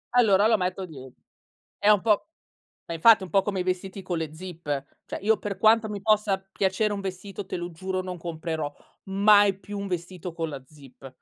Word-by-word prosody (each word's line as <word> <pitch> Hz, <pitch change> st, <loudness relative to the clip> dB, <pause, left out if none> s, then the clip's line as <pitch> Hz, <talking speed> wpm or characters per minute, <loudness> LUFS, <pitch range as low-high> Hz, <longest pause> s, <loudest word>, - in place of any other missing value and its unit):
Allora 205 Hz, -4 st, +5 dB
lo 225 Hz, -1 st, +4 dB
metto 185 Hz, 0 st, -2 dB
die 135 Hz, -6 st, -11 dB, 0.7 s
È 205 Hz, -, +3 dB
un 210 Hz, -2 st, +6 dB
po' 210 Hz, -1 st, +2 dB, 0.6 s
ma 170 Hz, -, -5 dB
infatti, 215 Hz, +6 st, +6 dB
è -, -, -5 dB
un 185 Hz, -, -7 dB
po' 195 Hz, -, +4 dB
come 195 Hz, -3 st, -1 dB
i -, -, -1 dB
vestiti 185 Hz, +2 st, -3 dB
con 175 Hz, -, -2 dB
le 160 Hz, -2 st, -4 dB
zip: 160 Hz, -5 st, -4 dB, 0.2 s
cioè -, -, -6 dB
io 215 Hz, +2 st, +3 dB
per 205 Hz, -2 st, -5 dB
quanto 220 Hz, 0 st, +4 dB
mi 205 Hz, -1 st, -5 dB
possa 210 Hz, -2 st, +2 dB
piacere 195 Hz, +2 st, +1 dB
un 200 Hz, -, -3 dB
vestito 195 Hz, +1 st, -6 dB
te -, -, -5 dB
lo 175 Hz, 0 st, -5 dB
giuro 185 Hz, +3 st, -3 dB
non 185 Hz, -1 st, -6 dB
comprerò 160 Hz, -3 st, -4 dB, 0.3 s
mai 200 Hz, 0 st, +5 dB
più 205 Hz, 0 st, -7 dB
un 200 Hz, -, -4 dB
vestito 180 Hz, -1 st, -5 dB
con 165 Hz, -1 st, -3 dB
la 140 Hz, -3 st, -7 dB
zip. 135 Hz, -2 st, -14 dB
190 Hz, 210 wpm, -26 LUFS, 170-205 Hz, 0.7 s, un